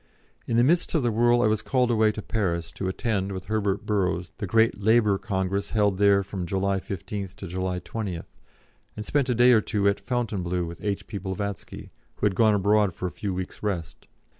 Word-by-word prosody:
In 115 - +1
the 120 - +5
midst 170 +6 +2
of 155 - +2
the 120 - +2
whirl 120 +2 +3
I - - +4
was 110 0 +1
called 125 -2 +1
away 110 -2 +3
to 105 - -6
Paris 85 -6 -2
to 95 - -4
attend, 100 0 -1
with 95 -1 -5
Herbert 105 -1 -1
Burrows, 90 -5 0
the 100 - -3
great 110 +1 +2
Labour 105 -2 +3
Congress 100 -1 -2
held 105 -3 +1
there 100 -1 +5
from 95 -2 -5
July 95 +1 0
15th 95 0 -6
to - - -8
July 90 0 -2
20th, 100 -7 -5 0.7
and 105 - -5
spent 140 0 0
a 125 - +2
day 120 +2 +6
or 110 -3 +5
two 100 -1 0
at 100 - +2
Fontainebleau 95 -8 -2
with 85 +1 -9
H.P. 100 0 -3
Blavatsky, 100 +1 -5 0.2
who - - -2
had 105 - +3
gone 110 +2 +4
abroad 100 -2 +2
for - - -5
a 90 - -2
few 100 - -4
weeks' 90 0 -5
rest. 90 -7 -4
100 Hz, 205 wpm, -26 LUFS, 95-110 Hz, 0.7 s, day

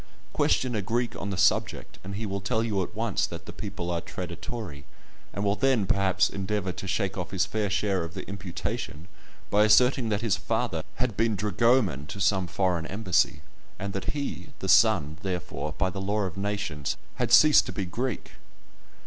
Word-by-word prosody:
Question 130 -2 +2
a 105 - 0
Greek 120 +5 -1
on 100 - -3
the 95 - -3
subject, - - +1
and 95 +1 -6
he 110 +3 -3
will 100 -1 -3
tell 110 +3 0
you 105 -4 0
at 90 - -5
once - - 0
that - - -8
the - - -8
people 85 0 -5
are 85 -1 -1
traditori, 90 -3 -6 0.5
and 100 - -3
will 100 0 +2
then, 130 -4 +2
perhaps, 95 -1 +2
endeavour 100 -1 -2
to 95 - -7
shake 95 -1 -1
off 90 - -4
his 95 -1 +1
fair 105 +2 -1
share 100 -2 0
of 85 0 -7
the - - -6
imputation 90 -4 -5 0.4
by 105 +1 +5
asserting 120 +3 +5
that 105 -1 0
his 115 -5 +1
father 80 - -1
had 120 -3 -1
been 115 0 +2
dragoman 105 - +2
to 100 - -7
some 95 -2 +2
foreign 90 -3 0
embassy, 100 -3 +1 0.4
and 100 0 -4
that 95 - -2
he 145 0 -4
(the 95 - -5
son), 95 -6 +4
therefore, 90 -5 -4
by 95 -1 +1
the 95 +1 -5
law 105 +2 0
of 95 -4 -3
nations, 100 -8 -2 0.2
had - - 0
ceased 155 -1 +7
to - - -3
be 100 - -3
Greek. 120 +6 -3
100 Hz, 190 wpm, -27 LUFS, 90-110 Hz, 0.5 s, ceased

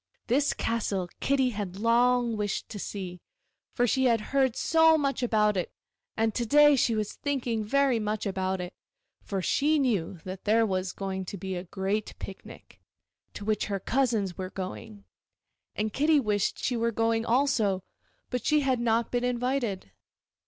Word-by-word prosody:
This 275 +4 +2
castle 200 -6 -2
Kitty 265 -2 +2
had 200 -4 -5
long 240 +1 +3
wished 210 -1 -3
to 210 - -7
see, 185 -3 -6 0.5
for 245 - +3
she 260 +2 +2
had 230 -2 +4
heard 265 -3 +3
so 320 0 +4
much 275 -3 -1
about 215 -3 +2
it; 180 - -2 0.5
and 225 -1 +1
to 240 - -1
day 295 +4 +6
she 235 -3 +2
was 215 -1 -2
thinking 250 -6 -2
very 265 +2 +2
much 215 0 -2
about 190 -1 -1
it, 180 0 -6 0.5
for 195 -2 -4
she 300 - +2
knew 205 - 0
that 185 0 -8
there 225 +2 +4
was 185 -2 -1
going 190 -1 -4
to 200 - -6
be 190 +1 -4
a 175 +1 -5
great 195 +4 -2
picnic, 140 - -11 0.5
to 205 - -7
which 215 0 0
her 200 -2 -2
cousins 225 -5 0
were 185 0 -3
going, 200 +2 -7 0.7
and 215 0 -2
Kitty 300 +2 +3
wished 210 -5 0
she 250 - -1
were 230 0 0
going 225 0 +1
also, 230 -6 +1 0.5
but 250 - -2
she 300 -1 +3
had 260 -3 +1
not 230 -1 +1
been 245 0 0
invited. 245 - -1
225 Hz, 165 wpm, -28 LUFS, 195-250 Hz, 0.7 s, day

